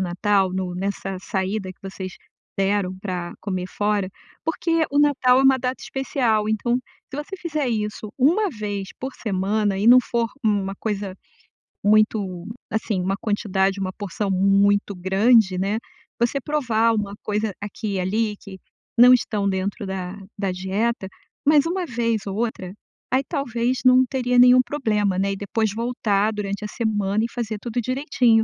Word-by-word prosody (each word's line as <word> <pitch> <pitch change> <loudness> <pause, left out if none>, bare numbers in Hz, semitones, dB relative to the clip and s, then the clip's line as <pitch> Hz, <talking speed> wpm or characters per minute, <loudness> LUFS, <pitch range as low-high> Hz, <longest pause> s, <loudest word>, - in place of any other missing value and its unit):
natal 190 +1 +1
no 185 -1 -3
nessa 195 0 -3
saída 190 0 -2
que - - -14
vocês 190 -1 -6 0.5
deram 195 -1 +1
pra 180 -3 -4
comer 185 -3 -3
fora. 205 -2 0 0.3
Porque 330 0 0
o 285 - +1
natal 265 -3 +4
é - - +2
uma 265 -1 +5
data 255 +1 -3
especial, 235 -5 0
então, 240 +3 +1 0.4
se 295 +2 -3
você 385 +5 -8
fizer 310 -6 -2
isso 210 -1 -3
1 345 +11 +3
vez 205 - -4
por 265 +1 -5
semana 200 0 0
e 210 - 0
não 250 +1 +9
for 235 -1 -1
uma 200 -3 +1
coisa 200 -3 -3 0.7
muito, 205 -4 +2 0.2
assim, 215 -3 -1
uma 195 +2 0
quantidade, 195 -2 0
uma 185 -1 -2
porção 200 0 -4
muito 200 +1 +3
grande, 190 +2 +3
né, 200 +4 0 0.4
você 240 +4 +1
provar 235 -6 +1
uma 205 -2 -2
coisa 210 0 -1
aqui 205 0 -5
e - - 0
ali 210 +3 0
que 195 -4 -11 0.4
não 250 +1 +8
estão 205 -4 -1
dentro 195 +3 -2
da 190 0 -4 0.2
da 195 -2 -1
dieta, 190 +3 -1 0.4
mas 295 0 +5
uma 360 +1 -1
vez 230 -5 -1
ou 195 - -3
outra, 210 -5 -3 0.4
aí 260 +2 +2
talvez 250 -4 -1
não 255 0 +7
teria 250 -1 0
nenhum 250 +1 +8
problema, 210 -9 0
né, 195 +1 +1
e - - -2
depois 205 +1 -1
voltar 220 -3 0
durante 205 0 -4
a - - -2
semana 210 -2 0
e 235 - -3
fazer 225 -3 -3
tudo 240 0 -3
direitinho, 255 -3 +2
210 Hz, 160 wpm, -23 LUFS, 195-245 Hz, 0.7 s, não